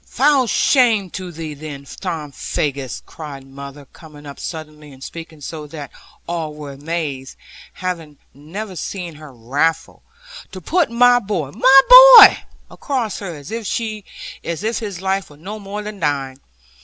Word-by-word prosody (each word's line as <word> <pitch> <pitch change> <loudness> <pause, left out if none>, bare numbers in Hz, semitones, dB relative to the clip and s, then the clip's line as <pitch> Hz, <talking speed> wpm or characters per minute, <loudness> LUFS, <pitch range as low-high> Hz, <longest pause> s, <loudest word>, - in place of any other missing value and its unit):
'Foul 270 -1 +2
shame 225 - +2
to 185 -1 -7
thee 160 -2 -7
then, 145 -1 -9
Tom 160 -1 -6
Faggus,' 140 -1 -4
cried 145 -4 -10
mother, 140 +1 -11
coming 150 -3 -14
up 140 -1 -10
suddenly, 155 -2 -8
and 135 0 -14
speaking 165 -1 -10
so 150 +1 -7
that 145 -3 -9 0.4
all 160 -3 -4
were 150 -2 -8
amazed, 140 -2 -5 0.4
having 165 -5 -5 0.2
never 185 +8 -8
seen 175 +1 -6
her 150 -1 -12
wrathful; 145 +7 -2 0.5
'to 185 - -8
put 330 - 0
my 245 +1 +5
boy, 185 - -4
my 260 - +6 0.4
boy, 410 -2 +10 0.3
across 250 -7 -3
her, 185 -5 -6
as 145 +3 -11
if 215 -2 -5
his 200 -5 -6
life 195 0 -1
were 145 - -16
no 200 +7 -8
more 205 +1 -6
than 210 -1 -8
thine! 140 -4 -2
165 Hz, 145 wpm, -19 LUFS, 145-205 Hz, 0.5 s, boy